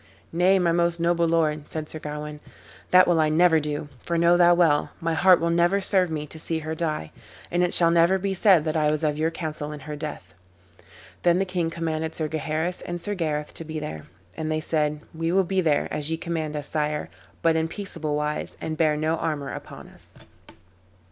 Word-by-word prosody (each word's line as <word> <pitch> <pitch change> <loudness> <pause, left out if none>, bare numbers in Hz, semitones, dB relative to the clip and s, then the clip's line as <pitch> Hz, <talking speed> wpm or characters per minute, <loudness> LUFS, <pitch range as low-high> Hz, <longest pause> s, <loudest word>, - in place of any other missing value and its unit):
"Nay, 180 +3 +4
my 175 -2 +2
most 170 0 +1
noble 170 0 +2
lord," 155 -2 0
said 155 -1 -4
Sir 155 - -8
Gawain, 150 0 -6 0.5
"that 185 0 +6
will 175 -2 +3
I 155 -1 +3
never 165 +1 +4
do; 150 0 -4
for 170 - -2
know 170 +1 +5
thou 175 0 +6
well, 160 -4 +3
my 165 -1 -1
heart 180 +2 +5
will 170 0 0
never 175 +3 +3
serve 190 -2 +2
me 155 -2 -3
to 160 +2 -10
see 165 +1 -2
her 160 - -2
die, 155 - -3 0.4
and 175 - +1
it 180 0 +2
shall 170 -1 +4
never 170 +3 +4
be 195 +1 -2
said 185 -4 +4
that 155 0 -1
I 155 -1 +2
was 155 +1 -1
of 150 -1 +1
your 160 +1 +2
counsel 155 -3 -5
in 150 -1 -8
her 150 +2 -6
death." 145 - -7 0.9
Then 175 0 +3
the 195 - +1
king 180 -3 -1
commanded 160 -1 -3
Sir 155 - -2
Gaheris 160 +3 -2
and 175 0 -5
Sir 205 +4 -3
Gareth 150 -5 -2
to - - -6
be 155 0 -6
there, 150 - -6 0.3
and 155 +6 -3
they 155 - 0
said, 150 -1 -1
"We 165 +1 -2
will 190 +1 +4
be 190 +1 0
there, 155 -4 +1
as 150 0 -2
ye 160 - -1
command 160 -2 -3
us, 145 -1 -5
sire, 150 -1 -2 0.3
but 165 -1 +4
in 160 0 +1
peaceable 165 -5 -4
wise, 150 0 -3
and 155 0 -4
bear 155 -2 +2
no 155 +2 0
armor 145 -6 -3
upon - - -9
us." - - -17
160 Hz, 215 wpm, -25 LUFS, 150-170 Hz, 0.9 s, that